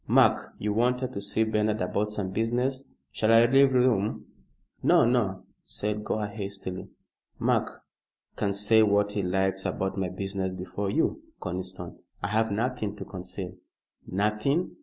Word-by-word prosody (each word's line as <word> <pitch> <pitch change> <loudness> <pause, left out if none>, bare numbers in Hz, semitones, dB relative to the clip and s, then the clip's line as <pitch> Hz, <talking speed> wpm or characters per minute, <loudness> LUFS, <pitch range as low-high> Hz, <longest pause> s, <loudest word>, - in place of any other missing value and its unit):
Mark, - - +4
you 105 0 -1
wanted 125 +3 +1
to 100 - -4
see 100 +2 0
Bernard 110 -1 +1
about 100 +3 0
some 105 -3 -3
business. 125 +6 0 0.3
Shall 110 +7 +1
I 115 +1 +7
leave 135 +2 +5
the 130 - +4
room?" 110 -5 +1 0.6
"No, - - +5
no!" 115 -6 +1 0.2
said 105 0 -3
Gore, 105 0 -1
hastily. 100 -3 -6 0.5
"Mark - - 0 0.5
can 100 -2 -1
say 105 +2 +4
what 105 -1 +3
he 105 0 -1
likes 95 +1 0
about 95 0 -2
my 95 -2 -1
business 95 0 -3
before 95 +2 -3
you, 165 - +1 0.2
Conniston. 90 -1 -6 0.2
I 90 - 0
have 110 +2 +2
nothing 110 -1 -1
to 100 -2 -7
conceal." 90 0 -7 0.5
"Nothing?" 105 - 0
105 Hz, 150 wpm, -27 LUFS, 95-115 Hz, 0.6 s, I